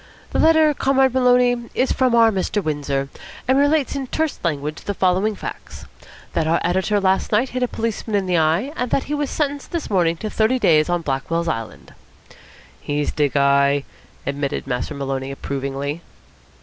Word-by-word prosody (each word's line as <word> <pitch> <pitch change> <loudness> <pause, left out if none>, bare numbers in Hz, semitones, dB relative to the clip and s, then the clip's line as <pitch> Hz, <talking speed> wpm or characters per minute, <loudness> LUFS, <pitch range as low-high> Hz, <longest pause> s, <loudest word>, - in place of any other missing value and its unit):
"The - - -1
letter, 315 -1 +5
Comrade 265 -2 +2
Maloney, 245 -2 +3
is 260 - +1
from 255 -3 +2
our 230 -1 +6
Mr. 200 +1 -1
Windsor, 140 -3 -2 0.4
and 260 +2 +4
relates 285 0 +2
in 270 -2 -3
terse 315 +2 -2
language 150 -2 -2
the 205 - -4
following 190 +4 +1
facts, - - -8 0.5
that 160 - 0
our 165 +1 +2
editor 190 +4 +1
last 190 -1 +1
night 225 +5 +2
hit 255 - -4
a 250 - +2
policeman 225 -2 -3
in 200 -1 +1
the 180 -1 0
eye, 165 - +1
and 250 0 -2
that 270 - +1
he 295 - -5
was 290 -2 -1
sentenced 285 -2 -2
this 335 -8 -4
morning 170 -4 +2
to 215 - -5
thirty 225 +4 +2
days 155 -8 +3
on 175 -1 0
Blackwell's 160 +4 -2
Island." 115 -8 -5 0.9
"He's 145 0 -1
de 145 -2 +1
guy!" 140 0 +3 0.4
admitted 140 0 -2
Master 125 +2 -3
Maloney 135 -1 -3
approvingly. 140 +2 -4
190 Hz, 175 wpm, -21 LUFS, -, 0.9 s, our